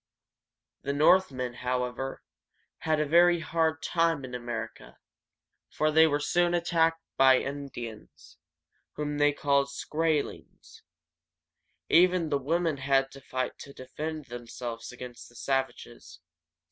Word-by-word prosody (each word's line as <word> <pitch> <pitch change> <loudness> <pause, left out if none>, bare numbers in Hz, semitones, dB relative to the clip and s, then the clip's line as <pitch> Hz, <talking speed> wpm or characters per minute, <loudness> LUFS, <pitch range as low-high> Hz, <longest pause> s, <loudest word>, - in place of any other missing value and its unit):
The 140 - -2
Northmen, 140 -5 +3
however, 125 +1 -3 0.6
had 155 -1 0
a 155 - +1
very 175 +2 +5
hard 160 -1 0
time 165 -5 +1
in 125 - -10
America, 120 -2 -6 0.7
for 155 0 0
they 160 +1 +6
were 145 -1 0
soon 175 +4 +1
attacked 165 -1 +1
by 130 -1 +7
the - - -2
Indians, 120 - -8 0.6
whom 150 0 -3
they 145 0 +5
called 140 -1 +1
Skrae´lings. 155 +2 -3 1.1
Even 180 - +4
the 140 -2 +1
women 165 +2 0
had 135 0 +1
to 135 - -12
fight 130 -1 -4
to 140 - -10
defend 155 +4 -6
themselves 120 -1 -7
against 125 -1 -10
the 120 - -21
savages. 135 - -4
140 Hz, 120 wpm, -28 LUFS, 125-160 Hz, 1.1 s, by